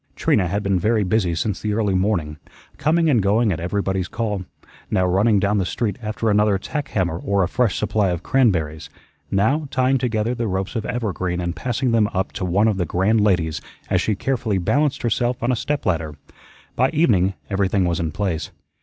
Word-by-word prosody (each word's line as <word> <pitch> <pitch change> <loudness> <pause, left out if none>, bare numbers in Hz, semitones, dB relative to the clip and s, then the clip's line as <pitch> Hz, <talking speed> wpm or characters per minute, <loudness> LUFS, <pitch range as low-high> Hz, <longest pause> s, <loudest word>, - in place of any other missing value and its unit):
Trina 95 -4 +2
had 100 +4 -2
been 100 -2 +1
very 110 +3 +2
busy 90 -3 +1
since 95 +3 -2
the 105 -1 -1
early 105 -3 +1
morning, 90 -6 0 0.4
coming 165 +2 +2
and 125 -8 +3
going 105 +3 +2
at 90 - -2
everybody's 95 +1 -1
call, 105 -4 -3 0.4
now 90 - +2
running 100 +4 +3
down 100 +1 +1
the - - +1
street 110 +4 -2
after 110 +1 -3
another 105 -1 +3
tack 145 +8 -4
hammer 90 -7 -1
or 100 0 +1
a - - +1
fresh 120 +1 0
supply 105 -2 +1
of 85 -2 -3
cranberries, 80 - +1 0.4
now 135 +10 +1
tying 130 0 +2
together 115 -1 0
the 120 -2 -2
ropes 95 +3 -3
of 110 -2 -2
evergreen 95 -7 -2
and 85 -1 -3
passing 125 +7 -1
them 110 -2 +3
up 95 +1 -1
to - - -5
one 100 +5 +2
of 105 -3 +1
the 90 - 0
grand 100 +7 +2
ladies 90 -7 +1 0.3
as - - +3
she 110 - 0
carefully 115 -2 -1
balanced 140 - 0
herself 120 +1 0
on 120 - +2
a - - +2
step 145 +5 -2
ladder. 80 -4 -1 0.6
By 130 +2 +3
evening 100 - +2 0.2
everything 95 -1 +1
was 85 -2 0
in 80 -2 -2
place. 95 -2 -2
100 Hz, 200 wpm, -21 LUFS, 90-115 Hz, 0.6 s, and